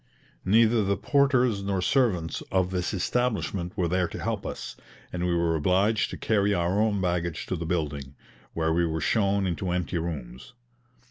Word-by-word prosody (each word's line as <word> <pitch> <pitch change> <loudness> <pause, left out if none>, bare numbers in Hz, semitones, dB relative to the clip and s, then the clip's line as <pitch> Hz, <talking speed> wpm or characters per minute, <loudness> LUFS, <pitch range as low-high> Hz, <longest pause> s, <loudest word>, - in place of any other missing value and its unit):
Neither 110 +3 +4
the 100 0 0
porters 130 -7 +2
nor 100 -1 -1
servants 90 -5 +1
of 95 -1 +1
this 90 -2 -1
establishment 100 -3 -1
were 90 -3 +1
there 90 +1 +1
to - - -7
help - - -2
us, - - -6 0.4
and 90 0 -1
we 85 - +1
were 85 -1 +1
obliged 95 +7 +2
to - - -6
carry 100 -2 +1
our 90 +4 +1
own 105 -2 +1
baggage 85 -3 -1
to - - -2
the 85 -1 -4
building, 75 -5 -3 0.4
where 80 -1 0
we 85 +1 +2
were 80 0 -2
shown 100 +3 +1
into 90 +1 -2
empty 90 0 -1
rooms. 70 - -6
90 Hz, 175 wpm, -27 LUFS, 85-100 Hz, 0.4 s, Neither